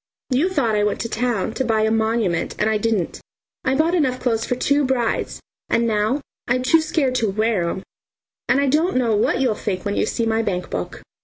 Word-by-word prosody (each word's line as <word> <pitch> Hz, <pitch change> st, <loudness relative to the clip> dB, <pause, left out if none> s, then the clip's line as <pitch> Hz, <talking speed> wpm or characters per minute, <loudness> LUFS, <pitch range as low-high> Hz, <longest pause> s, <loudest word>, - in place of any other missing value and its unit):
You 285 Hz, +9 st, +2 dB
thought 275 Hz, -12 st, +1 dB
I 210 Hz, -1 st, +2 dB
went 210 Hz, -, 0 dB
to 230 Hz, -, -3 dB
town 225 Hz, -3 st, -1 dB
to 265 Hz, -, -1 dB
buy 225 Hz, -3 st, +1 dB
a 220 Hz, 0 st, +2 dB
monument, 220 Hz, -6 st, 0 dB
and -, -, +1 dB
I 215 Hz, -, +1 dB
didn't; 210 Hz, -5 st, -1 dB, 0.4 s
I 260 Hz, -, +1 dB
bought 320 Hz, +4 st, +2 dB
enough 265 Hz, -8 st, +1 dB
clothes 225 Hz, -3 st, 0 dB
for 250 Hz, -, -1 dB
two 285 Hz, +3 st, +2 dB
brides, 255 Hz, -4 st, -1 dB, 0.3 s
and 235 Hz, -, +2 dB
now 220 Hz, +5 st, +1 dB, 0.3 s
I'm 250 Hz, +1 st, +1 dB
too 320 Hz, +5 st, +4 dB
scared 300 Hz, -4 st, 0 dB
to 225 Hz, -3 st, +1 dB
wear 210 Hz, -4 st, 0 dB
'em, 190 Hz, -, -5 dB, 0.7 s
and 275 Hz, -, +4 dB
I 280 Hz, -, +2 dB
don't 305 Hz, +4 st, +2 dB
know 235 Hz, -4 st, +2 dB
what 210 Hz, -, +1 dB
you'll 250 Hz, -4 st, +2 dB
think 200 Hz, -3 st, -4 dB
when 205 Hz, 0 st, -1 dB
you -, -, +1 dB
see 230 Hz, -, -1 dB
my 225 Hz, 0 st, +1 dB
bankbook. 180 Hz, -, -4 dB
230 Hz, 215 wpm, -21 LUFS, 215-260 Hz, 0.7 s, too